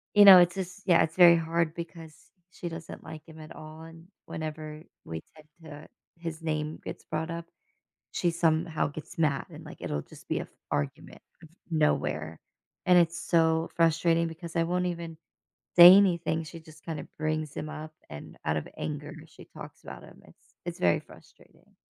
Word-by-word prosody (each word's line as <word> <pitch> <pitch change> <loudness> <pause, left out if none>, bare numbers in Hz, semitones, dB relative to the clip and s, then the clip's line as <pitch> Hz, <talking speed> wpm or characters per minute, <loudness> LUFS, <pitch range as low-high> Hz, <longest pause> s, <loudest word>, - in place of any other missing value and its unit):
you 205 - +9
know, 190 -2 +12
it's 175 0 +3
just, 185 +1 -6
yeah, 175 -3 +5
it's 160 0 -4
very 175 -2 +8
hard 165 0 0
because 165 -2 -8 0.4
she 175 -1 -6
doesn't 165 -1 -9
like 155 0 -10
him 160 -1 -13
at 155 0 -11
all, 155 +1 -11
and 165 +1 -13 0.2
whenever 155 0 -6 0.2
we 80 0 -6
tend 155 -1 -17 0.2
to 150 -1 -11 0.3
his 165 -2 -6
name 155 -1 -3
gets - - -7
brought 160 +2 -3
up, 170 0 -5 0.7
she 175 - +1
somehow 160 -2 +1
gets 150 +3 -10
mad 150 -4 +1
and, - - -11
like, - - -11
it'll 75 - -2
just - - -16
be - - 0
a - - -3
f - - -18 0.2
argument 75 -1 -4 0.2
out 160 - -14
of 170 - -29
nowhere, 150 - 0 0.5
and 180 -1 +6
it's 170 0 +2
so 165 -2 +2
frustrating 165 0 +3
because 165 +1 -9
I 165 - +3
won't 180 +1 0
even 170 -2 -5 0.6
say 175 +1 +11
anything. 170 -5 +2
She 165 +2 -10
just 155 -1 -17
kinda 160 -3 -5
brings 155 -1 -2
him 155 - -4
up 155 0 -8 0.2
and 75 - -10
out 75 - +1
of 75 - -4
anger, 150 0 -5
she 155 - -15
talks - - -12
about - - -10
him. - - -15
It's - - -23
it's 175 -1 -5
very 85 -1 +3
frustrating. - - -20
160 Hz, 185 wpm, -28 LUFS, 155-170 Hz, 0.7 s, know